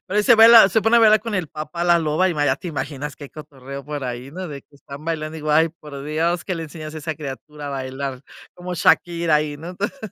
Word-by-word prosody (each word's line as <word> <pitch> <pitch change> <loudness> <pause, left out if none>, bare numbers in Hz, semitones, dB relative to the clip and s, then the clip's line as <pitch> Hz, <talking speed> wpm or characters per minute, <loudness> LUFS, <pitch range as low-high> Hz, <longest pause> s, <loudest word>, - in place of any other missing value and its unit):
Pero 200 +2 -3
ahí - - +3
se 240 - +6
baila 225 -2 +9
se 220 - +2
pone 225 +2 +4
a - - +6
bailar 215 -1 +6
con 225 -1 -5
el 180 -5 -2
papá 155 +3 -5
La 175 -1 +4
Loba, 160 +4 +1
y 170 - -2
ma 145 -1 0
ya 130 - +2
te 175 - -7
imaginas 145 -2 -5
que 145 - -10
hay - - -11
cotorreo 140 -2 -10
por 145 -2 -5
ahí, 125 +2 -6
¿no?, 180 +2 -6
de 140 -2 -8
que 145 - -28
están 140 +2 -11
bailando. 160 -1 -3
Digo: 155 0 -3
"Ay 160 +2 +4
por 150 -4 -11
Dios, 165 +3 -1
¿qué 185 - -3
le 165 - -5
enseñas 155 0 -9
a - - -5
esa 160 +1 -4
criatura 150 0 -8
a - - -4
bailar?", 135 0 -5 0.3
cómo 180 0 -6
Shakira 170 -1 +2
ahí, 150 -1 -2
¿no? 165 +4 -9
Entonces 205 +9 -4
155 Hz, 265 wpm, -21 LUFS, 145-175 Hz, 0.3 s, baila